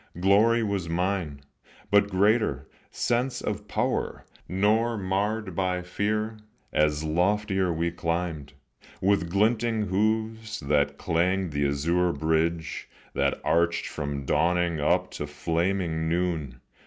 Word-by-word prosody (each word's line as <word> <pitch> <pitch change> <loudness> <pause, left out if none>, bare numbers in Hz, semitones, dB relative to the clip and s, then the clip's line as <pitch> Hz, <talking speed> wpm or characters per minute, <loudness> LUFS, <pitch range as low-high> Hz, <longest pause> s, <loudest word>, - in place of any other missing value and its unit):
Glory 110 +5 +4
was 100 -5 -2
mine, 85 -4 -1 0.5
but 100 0 +5
greater, 105 +4 +2 0.2
sense 120 +2 0
of 105 0 -4
power, - - -2 0.2
Nor 110 +5 +2
marred 100 0 -1
by 90 -1 0
fear, 105 +4 -2 0.4
as 75 0 +2
loftier 95 +3 +1
we 85 +1 -1
climbed, 85 -4 -3 0.5
With 95 -3 +2
glinting 110 +3 +2
hoofs, 110 +2 -1
that 70 -1 +1
clanged 90 +1 0
the 75 -1 +1
azure 85 +5 +1
bridge 80 +1 -1 0.2
That - - 0
arched 85 +1 +2
from 70 -2 -4
dawning 85 +1 +1
up 90 +5 +1
to 75 - -5
flaming 80 +2 -1
noon. 80 -7 -1
90 Hz, 115 wpm, -26 LUFS, 80-105 Hz, 0.5 s, but